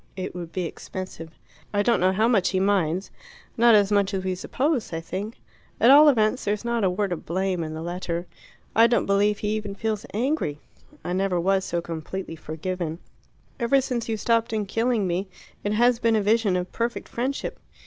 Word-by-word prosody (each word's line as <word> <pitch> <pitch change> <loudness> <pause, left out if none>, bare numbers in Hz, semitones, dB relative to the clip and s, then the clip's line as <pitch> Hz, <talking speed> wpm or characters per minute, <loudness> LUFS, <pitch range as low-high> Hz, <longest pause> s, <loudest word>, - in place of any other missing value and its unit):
It 185 - -5
would 170 -2 -7
be 185 - -2
expensive. 165 0 -7 0.4
I 205 0 +1
don't 235 +2 +3
know 185 +1 +3
how 215 +4 +2
much 215 -7 +3
he 190 - 0
minds 190 -2 +1 0.4
not 235 -1 +6
as 205 -1 +4
much 200 -1 +2
as 190 - -2
we 185 0 -1
suppose, 255 - -1
I 165 - -2
think. 195 +7 -6 0.4
At 240 - +6
all 295 +2 +9
events 225 -1 +2
there's 210 +2 -2
not 235 -2 0
a 190 - +4
word 195 +1 -1
of 175 - -3
blame 185 0 -1
in 155 0 -5
the 160 - -5
letter. 175 0 -3 0.5
I 230 +1 +7
don't 235 -3 +2
believe 200 +1 +2
he 210 - -2
even 210 -2 -3
feels 215 0 -3
angry. 230 - -1 0.4
I 175 - -3
never 185 -1 +1
was 190 +2 +1
so 170 -2 -2
completely 165 +2 -5
forgiven. 160 +1 -4 0.6
Ever 240 +3 +3
since 245 -3 -3
you 220 - 0
stopped 230 +2 +1
him 215 -1 0
killing 225 +1 0
me, 185 +2 -1 0.4
it 205 - 0
has 240 +2 +3
been 230 -2 +2
a 215 - +2
vision 210 -2 +2
of 180 0 -2
perfect 235 +1 -3
friendship. 260 +4 -3
200 Hz, 200 wpm, -25 LUFS, 180-230 Hz, 0.6 s, all